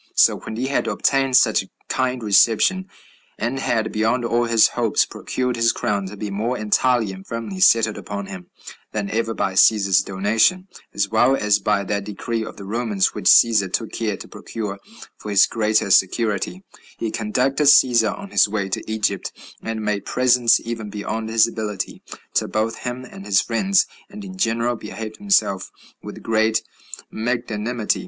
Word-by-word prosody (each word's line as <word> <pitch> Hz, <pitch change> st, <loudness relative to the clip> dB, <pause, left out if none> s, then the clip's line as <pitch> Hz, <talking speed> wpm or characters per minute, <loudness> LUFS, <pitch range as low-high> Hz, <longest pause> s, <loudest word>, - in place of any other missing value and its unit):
So -, -, +4 dB
when 110 Hz, -, -8 dB
he 125 Hz, +3 st, -2 dB
had 135 Hz, +1 st, -1 dB
obtained 135 Hz, -2 st, +2 dB
such 110 Hz, -3 st, +3 dB
a 95 Hz, -, -13 dB, 0.2 s
kind 130 Hz, -2 st, -1 dB
reception, 115 Hz, -, +3 dB, 0.5 s
and 120 Hz, +4 st, -2 dB
had, 110 Hz, -4 st, -1 dB
beyond 115 Hz, +3 st, 0 dB
all 120 Hz, +1 st, +1 dB
his 115 Hz, -2 st, +4 dB
hopes, -, -, +1 dB
procured 125 Hz, -1 st, -3 dB
his 115 Hz, 0 st, +3 dB
crown 100 Hz, -2 st, -2 dB
to 105 Hz, +2 st, -9 dB
be 105 Hz, 0 st, -5 dB
more 115 Hz, +5 st, -2 dB
entirely 110 Hz, +1 st, +1 dB
and 95 Hz, 0 st, -10 dB
firmly 115 Hz, -, -6 dB
settled 115 Hz, -, +4 dB
upon 100 Hz, -1 st, -6 dB
him 95 Hz, -2 st, -9 dB, 0.5 s
than 105 Hz, -2 st, -3 dB
ever 115 Hz, 0 st, -1 dB
by 95 Hz, -, -1 dB
Cæsar's 95 Hz, -1 st, +4 dB
donation, 110 Hz, -, +1 dB, 0.2 s
as 100 Hz, 0 st, -1 dB
well 120 Hz, +4 st, +3 dB
as 105 Hz, -4 st, +2 dB
by 100 Hz, 0 st, 0 dB
that 100 Hz, +1 st, -2 dB
decree 110 Hz, +2 st, -4 dB
of -, -, -9 dB
the 100 Hz, -, -9 dB
Romans, 105 Hz, -2 st, 0 dB
which -, -, -7 dB
Cæsar 105 Hz, -5 st, +5 dB
took 115 Hz, +2 st, -2 dB
care 105 Hz, -4 st, -3 dB
to -, -, -11 dB
procure 105 Hz, -3 st, -6 dB, 0.4 s
for 105 Hz, -, -8 dB
his 100 Hz, -2 st, +5 dB
greater 110 Hz, -2 st, 0 dB
security, 105 Hz, -, +1 dB, 0.3 s
he 115 Hz, -, -3 dB
conducted 130 Hz, +7 st, 0 dB
Cæsar 120 Hz, -5 st, +5 dB
on 200 Hz, 0 st, -10 dB
his -, -, +3 dB
way 100 Hz, -2 st, -2 dB
to -, -, -3 dB
Egypt, 105 Hz, -3 st, -1 dB, 0.3 s
and 110 Hz, -1 st, -4 dB
made 105 Hz, -2 st, -1 dB
presents, 125 Hz, -2 st, +3 dB
even 115 Hz, -2 st, -6 dB
beyond 110 Hz, +2 st, -4 dB
his 110 Hz, 0 st, +4 dB
ability, 105 Hz, -4 st, -5 dB, 0.3 s
to -, -, +1 dB
both 110 Hz, +1 st, -2 dB
him 125 Hz, +1 st, -5 dB
and 95 Hz, -, -11 dB
his 100 Hz, -1 st, +2 dB
friends, 190 Hz, +12 st, +1 dB, 0.2 s
and 205 Hz, 0 st, -10 dB
in 190 Hz, -1 st, -9 dB
general 115 Hz, -7 st, 0 dB
behaved 110 Hz, -1 st, -8 dB
himself 195 Hz, -, +1 dB, 0.3 s
with -, -, -10 dB
great 110 Hz, 0 st, +1 dB, 0.5 s
magnanimity. 115 Hz, -1 st, -2 dB
110 Hz, 170 wpm, -21 LUFS, 105-120 Hz, 0.5 s, Cæsar